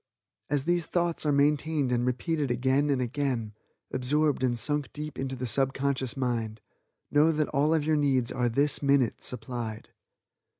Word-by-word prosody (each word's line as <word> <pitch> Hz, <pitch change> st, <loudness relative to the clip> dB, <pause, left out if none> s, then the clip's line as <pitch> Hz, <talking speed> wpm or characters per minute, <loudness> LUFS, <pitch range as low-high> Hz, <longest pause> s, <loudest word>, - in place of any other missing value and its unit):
As 145 Hz, -2 st, 0 dB
these 175 Hz, 0 st, 0 dB
thoughts 170 Hz, -3 st, -1 dB
are -, -, +3 dB
maintained 145 Hz, -1 st, +1 dB
and 120 Hz, 0 st, +1 dB
repeated 145 Hz, +3 st, -1 dB
again 130 Hz, +4 st, +1 dB
and 140 Hz, -2 st, +1 dB
again, 125 Hz, -4 st, -2 dB, 0.4 s
absorbed 145 Hz, +3 st, +2 dB
and 125 Hz, -2 st, +1 dB
sunk 145 Hz, +4 st, -1 dB
deep 150 Hz, 0 st, -6 dB
into 135 Hz, 0 st, -3 dB
the 130 Hz, 0 st, -4 dB
subconscious 135 Hz, 0 st, 0 dB
mind, 115 Hz, -4 st, -2 dB, 0.5 s
know 150 Hz, +2 st, +4 dB
that 155 Hz, -1 st, -1 dB
all 145 Hz, +3 st, +1 dB
of 160 Hz, -2 st, +1 dB
your 155 Hz, 0 st, +2 dB
needs 130 Hz, -4 st, +1 dB
are 125 Hz, -1 st, 0 dB
this 140 Hz, +5 st, +3 dB
minute 140 Hz, -5 st, +2 dB
supplied. 115 Hz, -2 st, -4 dB
135 Hz, 160 wpm, -28 LUFS, 125-150 Hz, 0.5 s, know